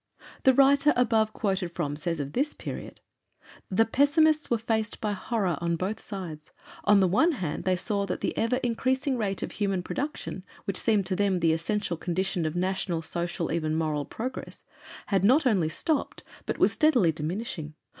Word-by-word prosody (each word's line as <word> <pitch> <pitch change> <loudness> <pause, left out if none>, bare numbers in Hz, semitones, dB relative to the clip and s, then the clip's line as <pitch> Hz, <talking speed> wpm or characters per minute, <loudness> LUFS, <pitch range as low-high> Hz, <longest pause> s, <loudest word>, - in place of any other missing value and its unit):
The 265 - +7
writer 280 +2 +5
above 225 -3 +2
quoted 190 -5 -2
from 145 -5 -2
says 165 +2 -2
of 140 0 -4
this 285 +4 0
period: - - -7 0.7
"The 210 +4 +3
pessimists 305 +5 +3
were 235 - +2
faced 220 -1 -2
by 210 - -1
horrors 200 -5 -1
on 170 0 0
both 190 +6 -3
sides. 175 -7 -7 0.4
On 205 -1 +6
the 190 - +4
one 320 - +3
hand, 175 - -4
they 185 -1 +3
saw 200 +1 -2
that 180 - -3
the - - -1
ever 230 +2 +1
increasing 260 +3 0
rate 200 -5 -2
of - - -4
human 195 -3 -1
production 275 -6 -4 0.2
which 195 -2 -2
seemed 210 -4 +2
to 185 0 -1
them 195 -2 +1
the 165 -1 +3
essential 170 +2 -1
condition 175 0 -1
of 155 - -4
national, 180 -2 -1
social, 170 +1 -2
even 155 -1 0
moral 155 -3 -1
progress, 250 - -6 0.4
had 195 -3 +1
not 265 +9 +5
only 190 -10 +3
stopped 295 - -1 0.2
but - - -2
was - - +3
steadily 255 - +4
diminishing. 160 -1 -4
195 Hz, 175 wpm, -27 LUFS, 170-235 Hz, 0.7 s, The